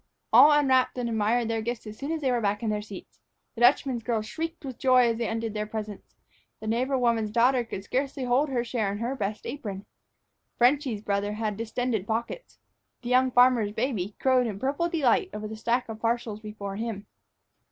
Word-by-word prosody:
All 265 Hz, +6 st, +9 dB
unwrapped 265 Hz, -4 st, +3 dB
and 245 Hz, -1 st, -1 dB
admired 225 Hz, +1 st, +1 dB
their 225 Hz, -1 st, -1 dB
gifts 235 Hz, +1 st, -4 dB
as 215 Hz, 0 st, -8 dB
soon 280 Hz, +6 st, -5 dB
as 325 Hz, -1 st, -2 dB
they 265 Hz, -3 st, +1 dB
were 240 Hz, -1 st, +1 dB
back 205 Hz, +2 st, -1 dB
in 220 Hz, -, 0 dB
their 210 Hz, 0 st, -1 dB
seats. 205 Hz, -2 st, -11 dB, 0.3 s
The 235 Hz, -, -8 dB
Dutchman's 250 Hz, 0 st, +3 dB
girls 225 Hz, -2 st, -1 dB
shrieked 325 Hz, +6 st, -5 dB
with 260 Hz, -3 st, -7 dB
joy 255 Hz, -2 st, +5 dB
as 230 Hz, -, -1 dB
they 235 Hz, -, -1 dB
undid 225 Hz, -1 st, -3 dB
their 210 Hz, 0 st, -3 dB
presents, 215 Hz, -1 st, -7 dB, 0.4 s
the -, -, -9 dB
neighbor 250 Hz, +5 st, 0 dB
woman's 230 Hz, -3 st, +1 dB
daughter 245 Hz, +3 st, +3 dB
could 195 Hz, -4 st, -7 dB
scarcely 270 Hz, +4 st, -2 dB
hold 255 Hz, +4 st, +2 dB
her 245 Hz, -3 st, 0 dB
share 230 Hz, -4 st, -1 dB
in 200 Hz, -, -4 dB
her 235 Hz, +5 st, -2 dB
best 210 Hz, -3 st, -4 dB
apron. 205 Hz, -8 st, -6 dB, 0.7 s
"Frenchy's" 245 Hz, -3 st, +2 dB
brother 205 Hz, 0 st, -1 dB
had 215 Hz, -1 st, -2 dB
distended 225 Hz, -1 st, -2 dB
pockets. 235 Hz, -, -4 dB, 0.5 s
The 240 Hz, -, -4 dB
young 255 Hz, +1 st, +4 dB
farmer's 245 Hz, -4 st, +4 dB
baby 215 Hz, -5 st, -2 dB
crowed 255 Hz, -2 st, +3 dB
in 205 Hz, -3 st, -4 dB
purple 280 Hz, +9 st, -1 dB
delight 320 Hz, +1 st, +2 dB
over 215 Hz, 0 st, -5 dB
the 220 Hz, -, -7 dB
stack 235 Hz, +3 st, 0 dB
of 220 Hz, -1 st, -8 dB
parcels 230 Hz, -2 st, -1 dB
before 210 Hz, -2 st, -7 dB
him. 220 Hz, -2 st, -4 dB
235 Hz, 200 wpm, -27 LUFS, 215-255 Hz, 0.7 s, All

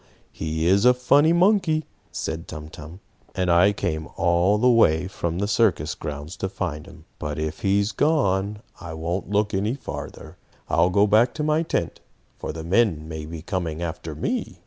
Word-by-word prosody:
He 80 Hz, 0 st, -3 dB
is 95 Hz, +4 st, +4 dB
a 125 Hz, 0 st, +6 dB
funny 140 Hz, +5 st, +4 dB
monkey," 175 Hz, -3 st, +3 dB, 0.3 s
said 80 Hz, +1 st, -4 dB
Tum 75 Hz, -2 st, -8 dB
Tum. 80 Hz, +5 st, -11 dB, 0.3 s
"And 90 Hz, -1 st, +1 dB
I 90 Hz, +4 st, +5 dB
came 80 Hz, -5 st, -3 dB
all 85 Hz, +4 st, +3 dB
the 125 Hz, +4 st, +3 dB
way 90 Hz, -9 st, +4 dB
from 85 Hz, -3 st, -3 dB
the 100 Hz, +2 st, -1 dB
circus 100 Hz, -8 st, +1 dB
grounds 75 Hz, +3 st, -6 dB
to 95 Hz, -, -3 dB
find 90 Hz, -6 st, -4 dB
him. -, -, -15 dB
But 75 Hz, -1 st, -4 dB
if 80 Hz, 0 st, -3 dB
he 100 Hz, 0 st, +2 dB
is 100 Hz, +2 st, 0 dB
gone, 105 Hz, -7 st, +1 dB, 0.2 s
I 80 Hz, -2 st, -7 dB
won't 85 Hz, +5 st, -3 dB
look 105 Hz, +1 st, +1 dB
any 105 Hz, +6 st, 0 dB
farther. 140 Hz, -, -8 dB, 0.3 s
I'll 85 Hz, +2 st, +3 dB
go 100 Hz, +3 st, +4 dB
back 110 Hz, +4 st, +3 dB
to 155 Hz, -, -2 dB
my 155 Hz, +1 st, +2 dB
tent, 165 Hz, -, -2 dB, 0.4 s
for -, -, -4 dB
the 80 Hz, 0 st, -7 dB
men 85 Hz, -4 st, +1 dB
may 80 Hz, -1 st, -6 dB
be 80 Hz, -1 st, -8 dB
coming 85 Hz, -3 st, -3 dB
after 80 Hz, -2 st, -5 dB
me." -, -, -3 dB
95 Hz, 185 wpm, -24 LUFS, 80-110 Hz, 0.4 s, a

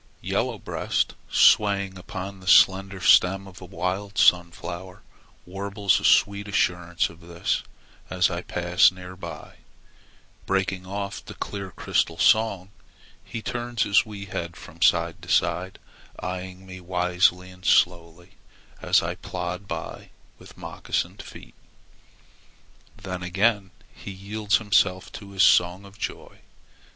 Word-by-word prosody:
Yellow -, -, -1 dB
Breast, -, -, -2 dB, 0.2 s
swaying 100 Hz, -2 st, +4 dB
upon 95 Hz, +1 st, -7 dB
the 95 Hz, -, -14 dB
slender 95 Hz, 0 st, +4 dB
stem 95 Hz, +2 st, +5 dB
of 95 Hz, -1 st, -13 dB
a -, -, -8 dB
wild 95 Hz, +3 st, -4 dB
sunflower, 90 Hz, +1 st, +1 dB, 0.4 s
warbles 100 Hz, +1 st, 0 dB
a -, -, -10 dB
sweet 100 Hz, 0 st, +3 dB
assurance 90 Hz, -3 st, 0 dB
of 85 Hz, -, -17 dB
this 85 Hz, 0 st, -2 dB, 0.5 s
as 90 Hz, 0 st, +2 dB
I 85 Hz, 0 st, -3 dB
pass 90 Hz, 0 st, +3 dB
near 90 Hz, 0 st, -10 dB
by. 85 Hz, -4 st, -9 dB, 0.9 s
Breaking 95 Hz, -1 st, -1 dB
off 100 Hz, 0 st, -5 dB
the -, -, -10 dB
clear 100 Hz, -2 st, -5 dB
crystal 85 Hz, -1 st, -1 dB
song, 95 Hz, +1 st, +2 dB, 0.5 s
he 115 Hz, -, -7 dB
turns 120 Hz, -1 st, -2 dB
his 100 Hz, 0 st, +4 dB
wee 100 Hz, -2 st, -8 dB
head 85 Hz, -3 st, -5 dB
from -, -, -13 dB
side -, -, +2 dB
to -, -, -12 dB
side 95 Hz, +2 st, +1 dB, 0.4 s
eyeing 90 Hz, +1 st, -6 dB
me 95 Hz, 0 st, -10 dB
wisely 90 Hz, 0 st, +1 dB
as 90 Hz, 0 st, -9 dB
slowly 85 Hz, -1 st, +1 dB, 0.5 s
I -, -, +2 dB
plod 90 Hz, +3 st, -6 dB, 0.7 s
with -, -, -15 dB
moccasined 95 Hz, +3 st, -4 dB
feet. -, -, -13 dB, 1.4 s
Then 95 Hz, -3 st, -6 dB
again 95 Hz, +3 st, +1 dB, 0.2 s
he -, -, -10 dB
yields 100 Hz, +2 st, -1 dB
himself 100 Hz, -3 st, +1 dB
to 100 Hz, -, -10 dB
his 95 Hz, -1 st, +3 dB
song 90 Hz, +3 st, +4 dB
of 100 Hz, +2 st, -16 dB
joy. -, -, -6 dB
95 Hz, 125 wpm, -25 LUFS, 90-100 Hz, 1.4 s, stem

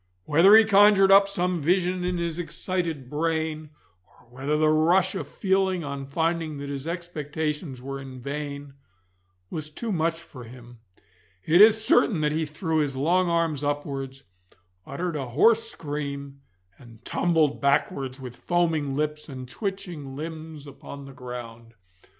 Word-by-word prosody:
Whether 170 Hz, +8 st, +6 dB
he 220 Hz, 0 st, +8 dB
conjured 200 Hz, -1 st, +6 dB
up 195 Hz, 0 st, +7 dB
some 180 Hz, -3 st, -1 dB
vision 180 Hz, +3 st, +1 dB
in 180 Hz, 0 st, -1 dB
his 170 Hz, -1 st, -3 dB
excited 170 Hz, -5 st, -3 dB
brain, 155 Hz, +1 st, -2 dB, 0.4 s
or -, -, -25 dB
whether 135 Hz, +4 st, -2 dB
the 155 Hz, 0 st, +3 dB
rush 170 Hz, +5 st, +3 dB
of 190 Hz, -, -4 dB
feeling 190 Hz, -2 st, 0 dB
on 140 Hz, -1 st, -5 dB
finding 160 Hz, +1 st, -1 dB
that 140 Hz, 0 st, -6 dB
his 140 Hz, +1 st, -5 dB
expectations 155 Hz, -5 st, -4 dB
were 135 Hz, 0 st, -5 dB
in 130 Hz, -1 st, -9 dB
vain, 140 Hz, +1 st, -6 dB, 0.8 s
was 155 Hz, -1 st, -5 dB
too 220 Hz, +9 st, -5 dB
much 165 Hz, -2 st, 0 dB
for 130 Hz, -6 st, -12 dB
him, 120 Hz, 0 st, -13 dB, 0.7 s
it 170 Hz, +4 st, +5 dB
is 220 Hz, 0 st, +6 dB
certain 210 Hz, -9 st, +3 dB
that 150 Hz, 0 st, +1 dB
he 160 Hz, +1 st, -1 dB
threw 160 Hz, +2 st, -2 dB
his 140 Hz, -3 st, -1 dB
long 175 Hz, +6 st, +2 dB
arms 165 Hz, -4 st, 0 dB
upwards, 140 Hz, -2 st, -4 dB, 0.6 s
uttered 170 Hz, +4 st, -3 dB
a 135 Hz, -3 st, -3 dB
hoarse 225 Hz, -, +3 dB
scream, 140 Hz, -2 st, -6 dB, 0.4 s
and 120 Hz, -2 st, -16 dB
tumbled 160 Hz, -4 st, +1 dB
backwards 140 Hz, -1 st, 0 dB
with 125 Hz, -2 st, -8 dB
foaming 165 Hz, -5 st, 0 dB
lips 150 Hz, +1 st, -3 dB
and 130 Hz, -2 st, -8 dB
twitching 175 Hz, -, -5 dB
limbs 155 Hz, 0 st, -7 dB
upon 140 Hz, 0 st, -10 dB
the 135 Hz, -, -11 dB
ground. 120 Hz, -2 st, -9 dB
155 Hz, 150 wpm, -25 LUFS, 140-175 Hz, 0.8 s, he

